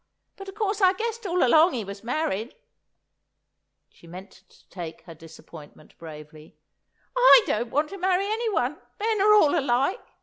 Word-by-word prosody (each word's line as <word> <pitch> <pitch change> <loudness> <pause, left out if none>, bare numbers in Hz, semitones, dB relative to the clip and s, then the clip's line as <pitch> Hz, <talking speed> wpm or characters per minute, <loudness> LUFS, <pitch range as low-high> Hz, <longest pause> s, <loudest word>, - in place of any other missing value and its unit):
But, 390 0 -10
of 385 - -12
course, 415 -1 -2
I 375 -1 +5
guessed 455 +1 -5
all 360 0 0
along 315 +7 +4
he 225 -4 -4
was 200 +1 -10
married." 240 -3 -3 1.3
She 170 - -21
meant 185 +3 -11
to 190 0 -24
take 170 -3 -9
her 170 - -13
disappointment 160 -1 -15
bravely. 155 -1 -13 0.6
"I - - +7
don't 230 +2 -2
want 300 +4 -1
to 395 - -9
marry 370 +1 0
anyone; 415 - -2 0.2
men 435 -1 -1
are 425 +1 +5
all 310 -6 +4
alike. 275 - -1
295 Hz, 160 wpm, -24 LUFS, -, 1.3 s, I